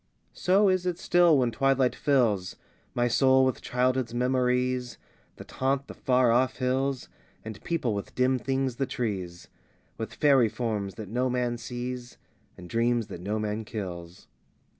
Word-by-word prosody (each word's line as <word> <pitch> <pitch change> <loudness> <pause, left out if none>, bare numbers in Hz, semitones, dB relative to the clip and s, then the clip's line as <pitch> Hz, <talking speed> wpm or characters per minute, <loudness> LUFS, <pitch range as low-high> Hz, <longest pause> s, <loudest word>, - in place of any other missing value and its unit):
X - - -15
So 195 +3 +4
is 185 -1 +1
it 175 -2 -1
still 175 -3 +4
when 125 -3 +1
twilight 135 0 +2
fills 115 -10 +1 0.4
My 120 0 +2
soul 130 +2 +4
with 130 - -1
childhood's 125 -1 0
memories 125 0 0 0.4
That - - -12
haunt 135 +1 0
the - - -10
far 125 -2 +2
off 130 +2 +2
hills, 130 +1 -1 0.4
And 110 -1 -8
people 150 -10 -1
with 100 -1 -6
dim 130 0 +2
things 130 0 -1
the 135 - -1
trees, 95 -8 -4 0.5
With 110 - -5
faery 135 -6 +4
forms 105 -5 -3
that 110 - -7
no 125 +5 -1
man 125 -1 -1
sees, 125 0 -6 0.4
And 90 - -10
dreams 115 +1 0
that 90 -3 -8
no 105 +4 -2
man 105 +1 -3
kills. 90 -5 -7
125 Hz, 160 wpm, -27 LUFS, 110-130 Hz, 0.5 s, So